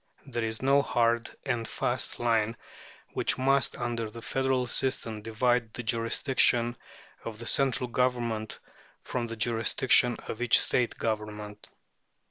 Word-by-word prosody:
There 120 -4 -3
is 110 +2 -4
no 140 +1 +5
hard 120 -3 +1 0.2
and 120 -4 -1
fast - - -1
line 115 -1 +1 0.6
which - - +1
must, 135 0 +2
under 120 -2 -2
the 115 +1 -10
federal 130 -1 0
system, 120 -3 -1
divide 115 +1 0
the 120 - -5
jurisdiction 120 +1 +2 0.5
of 115 -2 -6
the 115 - -8
central 130 0 +1
Government 120 -3 -1 0.5
from 120 -2 -3
the 115 - -5
jurisdiction 120 +2 +3
of 110 - -5
each 120 -1 +5
State 125 -2 0
Government. 105 -1 -4
120 Hz, 130 wpm, -28 LUFS, 115-125 Hz, 0.6 s, no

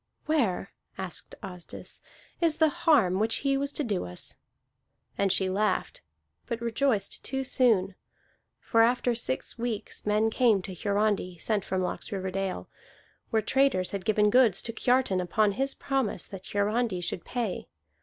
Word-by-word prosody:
"Where," 235 - 0 0.3
asked 190 -3 -6
Asdis, 180 -2 -9 0.4
"is 330 -2 +3
the 315 -1 +4
harm 285 - +3
which 225 +1 +2
he 275 0 +3
was 280 +1 -1
to 300 - -1
do 205 -7 -1
us?" 90 0 -6 0.8
And 195 -1 +1
she 190 0 +2
laughed, 195 - 0 0.5
but 235 - -3
rejoiced 235 -2 0
too 265 0 -2
soon. 225 -7 +3 0.7
For 230 - +2
after 245 +1 +3
six 230 - -3
weeks 230 -3 -3
men 215 +2 +2
came 220 -6 +3
to 190 - -6
Hiarandi, 200 -1 0
sent 210 +2 -1
from 190 -1 -1
Laxriverdale, 190 0 -3 0.6
where 220 -2 +1
traders 265 -7 +2
had 200 -2 -4
given 210 0 +3
goods 240 -6 +4
to 230 - -4
Kiartan 245 -5 +2
upon 205 +4 +2
his 270 +6 -1
promise 265 -10 -1
that 190 -1 -10
Hiarandi 205 -1 0
should 175 -1 -2
pay. 235 -7 -3
215 Hz, 145 wpm, -28 LUFS, 190-245 Hz, 0.8 s, the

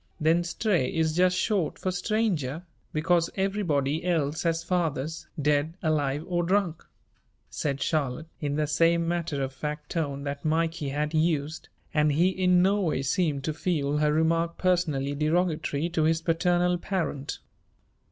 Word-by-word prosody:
"Then 165 +2 +3
Stray 170 - 0
is 160 -1 0
just 180 +1 +3
short 190 -4 0
for 185 - -2
stranger, 180 - -1 0.3
because 165 +2 +2
everybody 170 -7 0
else 160 -4 0
has 165 -1 0
fathers, 160 -3 -2
dead, 150 +3 +1
alive 150 -2 0
or 175 -1 0
drunk," 180 -2 0 0.7
said 140 -2 -2
Charlotte, 150 -1 -1
in 145 -1 -2
the 150 0 +1
same 165 +2 +2
matter 165 -5 -1
of 135 0 -4
fact 150 +2 -5
tone 140 -4 -2
that 140 0 -4
Mikey 160 -2 0
had 150 +2 -2
used, 155 -1 0 0.2
and 150 -1 +3
he 170 +5 +4
in 180 -1 +3
no 200 +2 +3
way 155 -7 0
seemed 145 -1 0
to 155 - -1
feel 150 -3 -1
her 150 0 +3
remark 165 +2 +1
personally 160 -7 +1
derogatory 155 0 0
to 165 -2 -1
his 160 +1 +2
paternal 175 +1 +2
parent. 170 -8 -3
160 Hz, 150 wpm, -27 LUFS, 150-175 Hz, 0.7 s, he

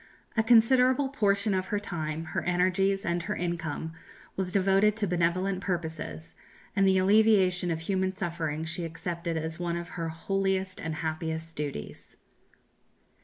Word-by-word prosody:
A 220 - +4
considerable 250 +4 +5
portion 205 -5 +1
of 185 0 -1
her 205 - 0
time, 160 -5 -4
her - - 0
energies, 185 +2 +1
and 170 0 0
her 170 - -3
income 165 -2 -3 0.4
was 190 -1 -2
devoted 195 +2 +3
to 215 - +1
benevolent 180 +2 0
purposes, 165 -3 -4 0.4
and 195 -1 +4
the 190 0 +4
alleviation 190 -2 +4
of 165 -1 -2
human 190 +2 0
suffering 165 -5 -3
she 165 +2 -2
accepted 170 0 -3
as 160 +1 -4
one 170 -1 -1
of 170 +1 -6
her 165 -1 -4
holiest 190 +2 -1
and 160 -1 -3
happiest 160 0 -3
duties. 145 - -5
180 Hz, 145 wpm, -28 LUFS, 165-195 Hz, 0.4 s, considerable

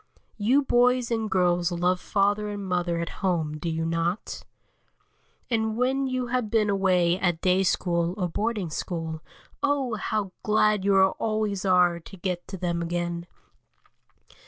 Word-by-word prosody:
You 255 +8 +3
boys 250 -1 +2
and 225 -2 -1
girls 175 -2 +2
love 180 +1 +1
father 205 +2 0
and 205 -1 -5
mother 175 -2 0
and 170 0 -2
home, 165 -6 -2
do 170 - -3
you 160 0 -2
not? 165 +4 -2 1.0
And 220 -2 0
when 265 +2 +1
you 255 -1 -1
have 245 -2 -1
been 215 -2 +2
away 185 -2 +2
at 175 -4 0
day 185 +1 +3
school 175 -1 0
or 180 -3 0
boarding 205 -1 -2
school, 160 -1 -4 0.4
oh! 280 -4 0
how 215 -3 -2
glad 215 -1 +2
you 195 -1 +4
always 205 +1 0
are 180 -2 +4
to 195 +4 -13
get 180 -1 -3
to 190 - -6
them 170 -1 -2
again. 170 0 -3
190 Hz, 150 wpm, -26 LUFS, 175-215 Hz, 1.0 s, you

